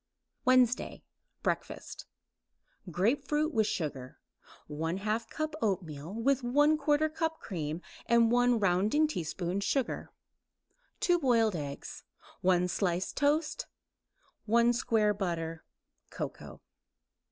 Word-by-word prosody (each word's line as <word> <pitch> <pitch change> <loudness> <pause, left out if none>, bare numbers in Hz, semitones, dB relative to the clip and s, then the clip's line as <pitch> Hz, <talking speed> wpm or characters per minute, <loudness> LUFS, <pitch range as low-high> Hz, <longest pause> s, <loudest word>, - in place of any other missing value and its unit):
WEDNESDAY 255 -1 +3 0.4
BREAKFAST - - -3 0.8
Grapefruit 280 - +1
with 220 -3 +2
sugar; 135 -6 -4 0.5
1/2 195 +9 -2
cup 310 0 -3
oatmeal 170 -6 -2
with 265 +4 +2
1/4 295 +4 +3
cup 320 0 -1
cream 160 -3 -4 0.2
and 235 -1 +4
1 245 -1 +4
rounding 205 - +3
teaspoon 180 - -2
sugar; 255 +6 -1 0.9
2 350 -1 +3
boiled 230 - +3
eggs; 140 -3 -6 0.4
1 180 -1 +3
slice 180 0 -1
toast; 300 +2 0 0.8
1 235 +2 +4
square 220 -3 +2
butter; 165 -5 -3 0.5
cocoa. - - -7
225 Hz, 95 wpm, -31 LUFS, 175-275 Hz, 0.9 s, and